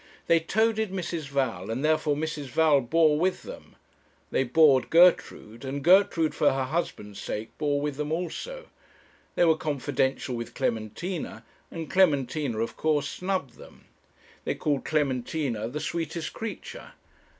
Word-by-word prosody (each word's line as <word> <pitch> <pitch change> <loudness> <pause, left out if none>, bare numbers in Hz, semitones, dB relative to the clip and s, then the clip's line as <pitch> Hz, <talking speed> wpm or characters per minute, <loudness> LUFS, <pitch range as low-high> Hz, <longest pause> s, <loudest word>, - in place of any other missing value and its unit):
they 165 - +4
toadied 220 +5 +1
Mrs. 170 -5 -4
Val, 130 -9 -2
and 125 +6 -2
therefore 155 -1 +2
Mrs. 150 -1 -3
Val 145 +1 +3
bore 150 +4 +3
with 185 +2 0
them; - - -11 0.6
they - - +2
bored 135 0 +4
Gertrude, 165 -9 +3
and 135 +1 -4
Gertrude, 175 -2 +4
for - - +3
her 135 0 -1
husband's 115 - -4
sake, 110 +2 -5
bore 145 -2 +1
with 145 -1 -3
them 150 0 -3
also; 465 - -4 0.7
they 175 - +4
were 160 -1 +5
confidential 140 -3 -1
with 115 0 -6
Clementina, 115 - -3 0.2
and 165 -2 -6
Clementina, 145 -8 +1
of 115 +1 -2
course, 150 -2 +1
snubbed 180 -10 -3
them. - - -15 0.6
They - - -2
called 145 -3 -1
Clementina 135 -5 -1
'the 140 +6 -5
sweetest 165 +1 -4
creature.' 225 -1 -7
150 Hz, 140 wpm, -27 LUFS, 130-165 Hz, 0.7 s, were